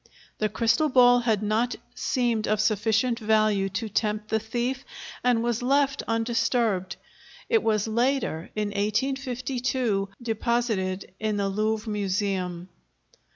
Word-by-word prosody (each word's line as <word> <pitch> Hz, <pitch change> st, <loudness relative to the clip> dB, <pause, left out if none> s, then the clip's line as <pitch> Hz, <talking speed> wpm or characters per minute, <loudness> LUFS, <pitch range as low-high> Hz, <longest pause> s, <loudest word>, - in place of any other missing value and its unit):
The 215 Hz, -, +1 dB
crystal 230 Hz, +8 st, +2 dB
ball 245 Hz, -2 st, +6 dB
had 220 Hz, -4 st, 0 dB
not 220 Hz, +4 st, +1 dB, 0.2 s
seemed 235 Hz, -4 st, 0 dB
of 215 Hz, -1 st, +1 dB
sufficient 220 Hz, +3 st, +1 dB
value 215 Hz, -3 st, +2 dB
to 220 Hz, +4 st, -3 dB
tempt 210 Hz, 0 st, -1 dB
the 220 Hz, -, +1 dB
thief 240 Hz, +4 st, -3 dB, 0.4 s
and 245 Hz, -2 st, +3 dB
was 235 Hz, -1 st, 0 dB
left 275 Hz, +2 st, +2 dB
undisturbed; 225 Hz, -4 st, 0 dB, 0.5 s
it 455 Hz, -2 st, +4 dB
was 215 Hz, -1 st, +1 dB
later, 235 Hz, -, 0 dB
in 210 Hz, -1 st, -1 dB
1852, 245 Hz, 0 st, -1 dB
deposited 220 Hz, -5 st, -1 dB
in 215 Hz, -1 st, -1 dB
the 200 Hz, -1 st, 0 dB
Louvre 215 Hz, +2 st, -1 dB
Museum. 190 Hz, -3 st, -2 dB
220 Hz, 120 wpm, -26 LUFS, 210-245 Hz, 0.5 s, ball